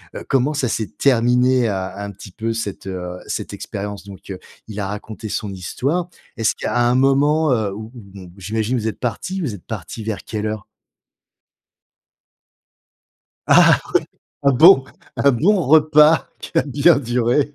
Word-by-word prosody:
heu, - - -6
comment 135 +3 +2
ça 140 -3 -1
s'est 110 -1 -2
terminé 125 -1 +3
un 95 -2 -3
un 100 0 -6
petit 100 0 -13
peu 115 +4 -3
cette, 110 -4 -5
heu, 90 -1 -5
cette - - -5
expérience? 100 0 -6
Donc, 100 0 -11 0.4
il 105 -1 -7
a 100 - -2
raconté 105 +2 -7
son 105 0 -3
histoire. 135 - -3 0.3
Est-ce 115 -1 +1
qu'à - - -3
un 120 0 +3
moment, 140 +3 +3
heu, 110 -5 0
où 110 +2 -7
où 120 - -10
bon, 95 -3 -11
j'imagine 110 +5 -2
vous 110 -1 -2
êtes 110 - -4
parti, 155 - -3
vous 130 -11 -3
êtes 90 - -15
parti 110 - -7
vers 110 -2 -4
quelle 110 -1 -4
heure? 110 -1 -4 2.8
Ah, - - +6
oui, - - -14 0.6
un 140 - +5
bon 150 +1 +7 0.3
un 140 - +3
bon 185 - +2
repas 150 0 +5
qui - - -9
a - - +3
bien 145 +4 +3
duré. 125 +3 0
120 Hz, 165 wpm, -20 LUFS, 105-140 Hz, 2.8 s, bon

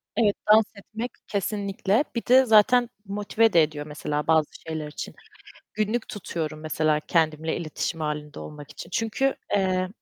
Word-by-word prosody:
Evet, 210 -3 +3 0.2
dans 215 0 +7
etmek 225 +4 -6 0.2
kesinlikle, 200 +3 0
bir 235 - -2
de 260 +1 +6
zaten 240 +2 +5 0.2
motive 205 +2 +1
de 165 -2 +7
ediyor 150 -1 -3
mesela 150 0 -3
bazı 160 -2 +4 0.2
şeyler 155 -1 -3
için. 150 - -7 0.6
Günlük 215 +2 -1
tutuyorum 160 -6 -4
mesela 155 -1 +1
kendimle 160 -1 0
iletişim 165 0 -3
halinde 150 -1 -4
olmak 150 -1 -9
için 170 - -10
çünkü, 245 +5 0 0.2
eee 185 -1 +1
185 Hz, 145 wpm, -25 LUFS, 155-215 Hz, 0.6 s, dans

